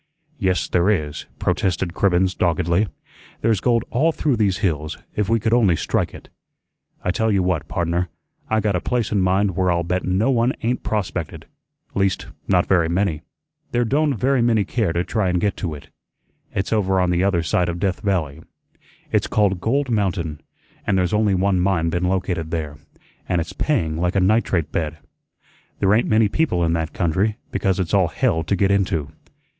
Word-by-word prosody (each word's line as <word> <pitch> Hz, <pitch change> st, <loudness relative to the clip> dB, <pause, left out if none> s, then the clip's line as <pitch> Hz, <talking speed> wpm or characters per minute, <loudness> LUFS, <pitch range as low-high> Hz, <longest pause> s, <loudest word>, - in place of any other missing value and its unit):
"Yes, 95 Hz, -4 st, +1 dB
there 90 Hz, +2 st, +2 dB
is," 75 Hz, -7 st, -1 dB
protested 90 Hz, -2 st, 0 dB
Cribbens 95 Hz, 0 st, +2 dB
doggedly; 85 Hz, +4 st, +1 dB, 0.5 s
"there's 110 Hz, -3 st, +2 dB
gold 120 Hz, 0 st, +1 dB
all 155 Hz, +7 st, +3 dB
through 150 Hz, -4 st, 0 dB
these 100 Hz, -4 st, +1 dB
hills, 75 Hz, -4 st, -2 dB, 0.2 s
if 105 Hz, -1 st, 0 dB
we 115 Hz, 0 st, +3 dB
could 110 Hz, +2 st, 0 dB
only 105 Hz, -8 st, +4 dB
strike -, -, -1 dB
it. -, -, -12 dB, 0.8 s
I 90 Hz, -, +1 dB
tell 110 Hz, +4 st, 0 dB
you 95 Hz, -2 st, +2 dB
what, 85 Hz, -4 st, -1 dB
pardner, 85 Hz, +1 st, -1 dB, 0.4 s
I 110 Hz, 0 st, +2 dB
got 105 Hz, -2 st, 0 dB
a 90 Hz, -, 0 dB
place 120 Hz, +7 st, -1 dB
in 105 Hz, -3 st, +2 dB
mind 95 Hz, +1 st, +2 dB
where 95 Hz, 0 st, +2 dB
I'll 85 Hz, 0 st, +1 dB
bet 90 Hz, +2 st, -1 dB
no 95 Hz, +8 st, +1 dB
one 120 Hz, +1 st, +2 dB
ain't 120 Hz, +2 st, 0 dB
prospected 90 Hz, -6 st, -3 dB, 0.5 s
least 95 Hz, -1 st, 0 dB, 0.2 s
not 90 Hz, -2 st, +3 dB
very 85 Hz, -4 st, +2 dB
many. 85 Hz, -3 st, 0 dB, 0.5 s
There 120 Hz, 0 st, +2 dB
don't 145 Hz, +3 st, +1 dB
very 130 Hz, +4 st, +2 dB
many 115 Hz, -4 st, +2 dB
care 110 Hz, -8 st, 0 dB
to 85 Hz, +1 st, 0 dB
try 105 Hz, -1 st, 0 dB
an' 90 Hz, -, +1 dB
get 100 Hz, +3 st, 0 dB
to 85 Hz, -5 st, -3 dB
it. 75 Hz, +1 st, -13 dB, 0.6 s
It's 95 Hz, +3 st, -2 dB
over 95 Hz, -3 st, +2 dB
on 90 Hz, -1 st, +2 dB
the 90 Hz, +1 st, +1 dB
other 95 Hz, -4 st, +2 dB
side 85 Hz, +2 st, +1 dB
of 85 Hz, 0 st, -4 dB
Death 95 Hz, -1 st, 0 dB
Valley. 85 Hz, -8 st, -1 dB, 0.7 s
It's -, -, +1 dB
called 100 Hz, -4 st, +1 dB
Gold 135 Hz, +4 st, 0 dB
Mountain, 90 Hz, -8 st, -1 dB, 0.5 s
an' 105 Hz, -, +2 dB
there's 90 Hz, +1 st, +1 dB
only 105 Hz, -2 st, +2 dB
one 95 Hz, 0 st, +2 dB
mine 90 Hz, -3 st, +1 dB
been 85 Hz, +1 st, 0 dB
located 90 Hz, -3 st, -1 dB
there, 75 Hz, -3 st, -4 dB, 0.5 s
an' 90 Hz, -, +2 dB
it's 80 Hz, -1 st, -4 dB
paying 80 Hz, -, 0 dB
like 90 Hz, +2 st, 0 dB
a -, -, +4 dB
nitrate 95 Hz, -4 st, +1 dB
bed. 80 Hz, -1 st, -2 dB, 0.8 s
There 95 Hz, +1 st, +3 dB
ain't 115 Hz, +3 st, +3 dB
many 110 Hz, 0 st, +4 dB
people 100 Hz, -, 0 dB
in 80 Hz, -, +1 dB
that 80 Hz, -2 st, -1 dB
country, 95 Hz, +5 st, 0 dB
because 95 Hz, -2 st, 0 dB
it's 90 Hz, -1 st, -2 dB
all 95 Hz, -3 st, +4 dB
hell 95 Hz, 0 st, 0 dB
to 100 Hz, -, +1 dB
get 100 Hz, +1 st, +2 dB
into. 90 Hz, -7 st, 0 dB
95 Hz, 190 wpm, -21 LUFS, 85-105 Hz, 0.8 s, only